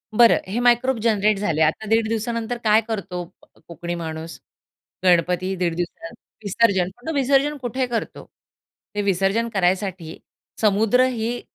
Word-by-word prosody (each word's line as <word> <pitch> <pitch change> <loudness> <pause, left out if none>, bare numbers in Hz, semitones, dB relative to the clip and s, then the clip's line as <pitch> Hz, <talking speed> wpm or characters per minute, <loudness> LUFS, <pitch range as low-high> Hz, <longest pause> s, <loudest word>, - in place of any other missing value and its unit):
बरं 235 +1 +6
हे 225 - -1
microbe 245 +1 +3
generate 215 -2 +2
झाले. 165 -6 -1
आता 160 +7 +1
1.5 225 0 +2
दिवसानंतर 230 +1 -2
काय 215 0 +4
करतो 195 -5 -4 0.4
कोकणी 170 +1 -5
माणूस? 160 -1 -6 0.6
गणपती 180 +1 +2
1.5 175 -2 -1
दिवस 170 -1 -5 0.3
विसर्जन, 200 -3 +2 0.2
तो 320 - -1
विसर्जन 280 +1 +2
कुठे 255 +1 -2
करतो? 235 -2 -4 0.7
ते 205 - 0
विसर्जन 200 +4 +1
करायसाठी 185 -3 -1 0.4
समुद्र 220 +4 +3
हे 240 -1 -2
210 Hz, 130 wpm, -22 LUFS, 180-235 Hz, 0.7 s, बरं